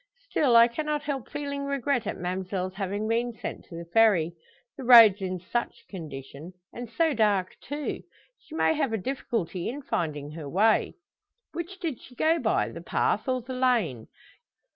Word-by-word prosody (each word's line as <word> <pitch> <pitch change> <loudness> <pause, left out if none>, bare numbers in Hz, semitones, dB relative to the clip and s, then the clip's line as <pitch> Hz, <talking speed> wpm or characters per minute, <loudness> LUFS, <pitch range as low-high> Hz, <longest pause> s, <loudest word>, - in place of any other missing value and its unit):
Still, 260 -6 +3
I 230 0 +8
cannot 300 +4 -2
help 275 -5 -4
feeling 280 -1 -4
regret 280 -3 -1
at - - -3
ma'mselle's 185 +1 -3
having 200 +2 -3
been 235 +2 0
sent - - -6
to 170 - -11
the 170 0 -7
Ferry 175 -3 +3 0.4
the 275 - -8
roads 230 -5 +8
in 185 -1 -3
such 235 +7 -4
condition. 150 -1 -8 0.2
And 240 -1 -7
so 320 +6 +1
dark, 205 -5 +1
too 290 0 -4 0.4
she 315 - -12
may 320 - +3
have 285 -7 -1
a - - +1
difficulty 205 -7 -3
in 280 +4 -6
finding 150 - -3
her 150 -2 -7
way. 215 +7 +2 0.6
Which 345 +3 -6
did 310 -8 -4
she 250 - -15
go 325 +6 +2
by - - +1
the - - -9
path - - 0
or 255 -2 0
the 260 +2 -6
lane? 235 - +1
225 Hz, 170 wpm, -27 LUFS, 185-275 Hz, 0.6 s, I